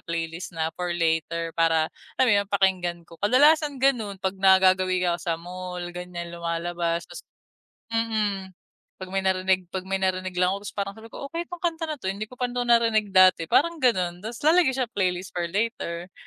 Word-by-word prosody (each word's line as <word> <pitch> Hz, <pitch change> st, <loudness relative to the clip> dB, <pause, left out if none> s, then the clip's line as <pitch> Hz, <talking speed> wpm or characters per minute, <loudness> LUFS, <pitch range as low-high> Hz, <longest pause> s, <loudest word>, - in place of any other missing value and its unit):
playlist 165 Hz, +1 st, -4 dB
na 160 Hz, 0 st, -1 dB
for 175 Hz, -1 st, -2 dB
later 165 Hz, 0 st, 0 dB
para 165 Hz, -1 st, +3 dB, 0.3 s
alam 260 Hz, -, +4 dB
mo -, -, +5 dB
yun 200 Hz, -, -1 dB
pakinggan 185 Hz, -3 st, +1 dB
ko, 165 Hz, -, -14 dB
kadalasan 285 Hz, +5 st, +4 dB
ganun 230 Hz, -7 st, +2 dB
pag 190 Hz, 0 st, -1 dB
nagagawi 185 Hz, -1 st, +4 dB
ako 170 Hz, -, -1 dB
sa 165 Hz, -2 st, -1 dB
mall 180 Hz, +1 st, -7 dB
ganyan 175 Hz, -1 st, -7 dB
lumalabas 170 Hz, 0 st, -2 dB, 0.9 s
mhm. 210 Hz, -4 st, -1 dB, 0.5 s
Pag 185 Hz, -, -6 dB
may 195 Hz, 0 st, -2 dB
narinig 185 Hz, -1 st, +1 dB
pag 190 Hz, -, -2 dB
may 195 Hz, +1 st, -1 dB
narinig 185 Hz, 0 st, -1 dB
lang 180 Hz, +1 st, +3 dB
ako 200 Hz, -, -5 dB
tapos 205 Hz, -, -8 dB
parang 200 Hz, 0 st, -2 dB
sabi 225 Hz, +1 st, -12 dB
ko 280 Hz, -, -8 dB
okay 335 Hz, +3 st, -4 dB
yung 355 Hz, -, -6 dB
kanta 330 Hz, -1 st, -1 dB
na 305 Hz, -, -3 dB
to 245 Hz, -, -12 dB
hindi 205 Hz, +3 st, -3 dB
ko 250 Hz, -, -14 dB
pa 250 Hz, -, 0 dB
to 245 Hz, 0 st, -2 dB
narinig 230 Hz, -3 st, +3 dB
dati 185 Hz, -3 st, +5 dB
parang 335 Hz, +1 st, +2 dB
ganun 180 Hz, -7 st, +1 dB
tas 225 Hz, +2 st, -7 dB
lalagay 325 Hz, -4 st, +5 dB
sa 255 Hz, -, +1 dB
playlist 185 Hz, -3 st, -2 dB
for 175 Hz, -1 st, -1 dB
later. 185 Hz, -4 st, -3 dB
190 Hz, 190 wpm, -25 LUFS, 175-225 Hz, 0.9 s, mo